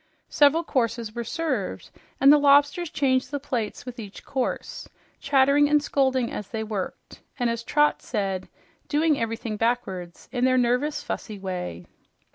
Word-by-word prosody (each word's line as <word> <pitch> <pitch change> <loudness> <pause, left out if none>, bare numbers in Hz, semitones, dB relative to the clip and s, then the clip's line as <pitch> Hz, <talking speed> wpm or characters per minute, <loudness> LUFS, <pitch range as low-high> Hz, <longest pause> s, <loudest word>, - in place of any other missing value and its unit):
Several 300 +3 +4
courses 235 -6 -1
were 235 0 -3
served, 265 - -3 0.3
and 275 +2 +8
the 295 - +5
lobsters 290 +4 +4
changed 260 -3 +1
the 285 - -3
plates 245 -7 -4
with 250 -1 -8
each 205 -3 -9
course, 280 - -3 0.3
chattering 280 +1 +4
and 300 0 +5
scolding 265 -4 +1
as 210 - -5
they 220 -1 -4
worked, 210 -4 -6 0.2
and 245 -3 +1
as 230 0 -3
Trot 295 +5 +2
said, 195 -4 -3 0.4
"doing 305 0 +2
everything 230 -1 -3
backwards" 195 -7 -2
in 245 -1 -1
their 255 0 +4
nervous, 250 +5 +1
fussy 215 -2 -5
way. 180 - -5
250 Hz, 150 wpm, -25 LUFS, 220-285 Hz, 0.4 s, and